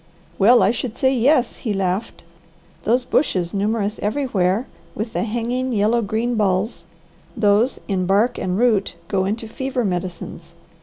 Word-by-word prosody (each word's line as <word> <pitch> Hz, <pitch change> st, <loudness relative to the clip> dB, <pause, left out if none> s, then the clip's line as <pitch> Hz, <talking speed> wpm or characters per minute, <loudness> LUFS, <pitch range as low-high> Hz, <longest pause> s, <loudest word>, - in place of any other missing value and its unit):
"Well 235 Hz, +5 st, +6 dB
I 200 Hz, -, +4 dB
should 240 Hz, -1 st, -4 dB
say 265 Hz, 0 st, +3 dB
yes," 255 Hz, 0 st, +2 dB
he 220 Hz, -, -3 dB
laughed. 190 Hz, +2 st, -2 dB, 0.6 s
"Those 245 Hz, +3 st, +2 dB
bushes, 180 Hz, -, 0 dB
numerous 210 Hz, +1 st, -1 dB
everywhere, 210 Hz, -3 st, 0 dB, 0.3 s
with 225 Hz, +2 st, -4 dB
the -, -, -1 dB
hanging 240 Hz, +3 st, -2 dB
yellow 220 Hz, +3 st, +2 dB
green 225 Hz, +3 st, -1 dB
balls, 205 Hz, 0 st, 0 dB, 0.5 s
those, 215 Hz, +3 st, +2 dB
in 185 Hz, -3 st, -1 dB
bark 210 Hz, +6 st, +2 dB
and 185 Hz, 0 st, -1 dB
root, 215 Hz, -6 st, +2 dB
go 190 Hz, -2 st, 0 dB
into 220 Hz, +3 st, -3 dB
fever 260 Hz, +1 st, -2 dB
medicines. 175 Hz, -2 st, -5 dB
220 Hz, 145 wpm, -21 LUFS, 195-240 Hz, 0.6 s, Well